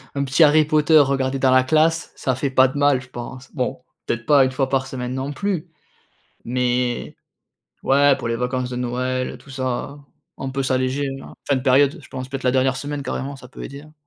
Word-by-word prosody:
un 140 Hz, -, 0 dB
petit 135 Hz, +5 st, +4 dB
Harry 155 Hz, 0 st, +5 dB
Potter 155 Hz, +1 st, +4 dB
regardé 135 Hz, -1 st, +1 dB
dans 130 Hz, -1 st, +3 dB
la 130 Hz, 0 st, +5 dB
classe, 160 Hz, +4 st, +2 dB
ça 130 Hz, -, -1 dB
fait 135 Hz, +2 st, -1 dB
pas 130 Hz, 0 st, +5 dB
de 130 Hz, -, -6 dB
mal 145 Hz, -2 st, +3 dB
je 130 Hz, -, -15 dB
pense. 125 Hz, +2 st, -9 dB
Bon, 125 Hz, -2 st, -3 dB, 0.2 s
peut-être 120 Hz, 0 st, -3 dB
pas 145 Hz, -2 st, +6 dB
1 130 Hz, -, -1 dB
fois 130 Hz, +1 st, 0 dB
par 130 Hz, -1 st, 0 dB
semaine 125 Hz, -1 st, -5 dB
non 130 Hz, +2 st, -3 dB
plus, 180 Hz, 0 st, -3 dB, 0.8 s
mais 125 Hz, 0 st, -1 dB, 0.7 s
ouais, 140 Hz, +1 st, +4 dB
pour -, -, -4 dB
les 115 Hz, -, 0 dB
vacances 125 Hz, +1 st, -2 dB
de -, -, -4 dB
Noël 125 Hz, +1 st, -2 dB
et -, -, -8 dB
tout 140 Hz, -, -19 dB
ça, 130 Hz, +2 st, -3 dB, 0.4 s
on 135 Hz, -, -4 dB
peut 135 Hz, +1 st, -2 dB
s'alléger, 130 Hz, +2 st, 0 dB
hein, -, -, -12 dB
fin 140 Hz, -, +3 dB
de 130 Hz, -, -1 dB
période, 140 Hz, +4 st, +3 dB
je 130 Hz, -, -15 dB
pense 130 Hz, -1 st, -6 dB
peut-être 135 Hz, 0 st, -6 dB
la 125 Hz, -, +3 dB
dernière 130 Hz, 0 st, +2 dB
semaine 145 Hz, +1 st, -4 dB
carrément, 135 Hz, +2 st, -4 dB
ça 125 Hz, -, -13 dB
peut 125 Hz, -, -10 dB
aider, 140 Hz, +1 st, -8 dB
hein. 155 Hz, +1 st, -17 dB
130 Hz, 220 wpm, -21 LUFS, 130-145 Hz, 0.8 s, pas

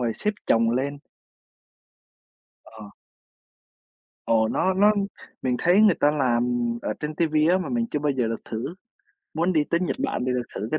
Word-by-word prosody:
rồi 115 Hz, -2 st, 0 dB
xếp 210 Hz, -, -1 dB, 0.2 s
chồng 115 Hz, 0 st, +3 dB
lên. 140 Hz, +4 st, -2 dB, 1.7 s
Ờ. 110 Hz, -, -15 dB, 1.5 s
Ồ, 110 Hz, -1 st, +3 dB
nó 185 Hz, +8 st, +1 dB
nó 205 Hz, +2 st, +5 dB, 0.5 s
mình 125 Hz, -1 st, 0 dB
thấy 180 Hz, -, +4 dB
người 210 Hz, -5 st, +6 dB
ta 145 Hz, -, +2 dB
làm 125 Hz, -5 st, +1 dB, 0.4 s
ở -, -, -2 dB
trên 150 Hz, +1 st, -4 dB
TV 160 Hz, -1 st, -1 dB, 0.2 s
á, 185 Hz, -, +3 dB
mà 185 Hz, -, -4 dB
mình 235 Hz, -1 st, -1 dB
chưa 150 Hz, -, -1 dB
bao 145 Hz, -1 st, 0 dB
giờ 125 Hz, -3 st, 0 dB
được 115 Hz, -, -5 dB
thử, 120 Hz, +9 st, -5 dB, 0.6 s
muốn 175 Hz, +3 st, +1 dB
đi 155 Hz, -3 st, +2 dB
tới 170 Hz, +3 st, 0 dB
Nhật 180 Hz, -, -1 dB
Bản 270 Hz, -, -2 dB
thì 130 Hz, -, +1 dB
được 125 Hz, -1 st, -1 dB
thử 105 Hz, +3 st, -4 dB
cái 155 Hz, -, 0 dB
145 Hz, 185 wpm, -24 LUFS, 120-175 Hz, 1.7 s, người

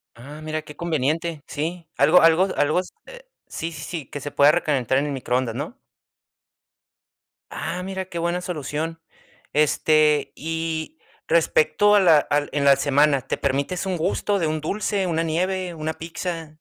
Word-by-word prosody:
Ah, 145 Hz, +6 st, -11 dB
mira, 155 Hz, 0 st, -3 dB
qué 150 Hz, -1 st, -12 dB
conveniente. 160 Hz, 0 st, -1 dB
Sí, 165 Hz, +3 st, -4 dB
algo 180 Hz, -, +5 dB
algo 165 Hz, +3 st, +5 dB
algo 155 Hz, +5 st, +2 dB
s 185 Hz, -, -13 dB
eh, -, -, -11 dB, 0.3 s
sí, 165 Hz, +1 st, -5 dB
sí, 155 Hz, -3 st, -9 dB
sí, 160 Hz, -5 st, -5 dB
que 145 Hz, -, -6 dB
se 145 Hz, +1 st, -6 dB
pueda 145 Hz, +1 st, +6 dB
recalentar 140 Hz, -6 st, +1 dB
en 140 Hz, -, +1 dB
el 145 Hz, -, -3 dB
microondas, 125 Hz, -3 st, -1 dB
¿no? 145 Hz, -, -5 dB, 1.8 s
Ah, 180 Hz, +2 st, -4 dB
mira 190 Hz, 0 st, -4 dB
qué 175 Hz, -2 st, -8 dB
buena 170 Hz, +1 st, -1 dB
solución. 165 Hz, -1 st, -4 dB, 0.5 s
Este, 150 Hz, -1 st, +3 dB
y 165 Hz, -, -4 dB, 0.3 s
respecto 470 Hz, -, +3 dB
a -, -, +6 dB
la 165 Hz, -6 st, +6 dB
al 145 Hz, 0 st, -1 dB
en 145 Hz, -, 0 dB
la 140 Hz, -, +7 dB
semana, 145 Hz, -1 st, +3 dB
¿te -, -, 0 dB
permites 140 Hz, +7 st, -1 dB
un 185 Hz, -2 st, -1 dB
gusto 200 Hz, +5 st, 0 dB
de 165 Hz, -, 0 dB
un 155 Hz, 0 st, -2 dB
dulce, 200 Hz, +3 st, -1 dB
una 165 Hz, -2 st, 0 dB
nieve, 180 Hz, +2 st, -1 dB
una 155 Hz, 0 st, -3 dB
pizza? 165 Hz, 0 st, -5 dB
160 Hz, 165 wpm, -23 LUFS, 145-180 Hz, 1.8 s, la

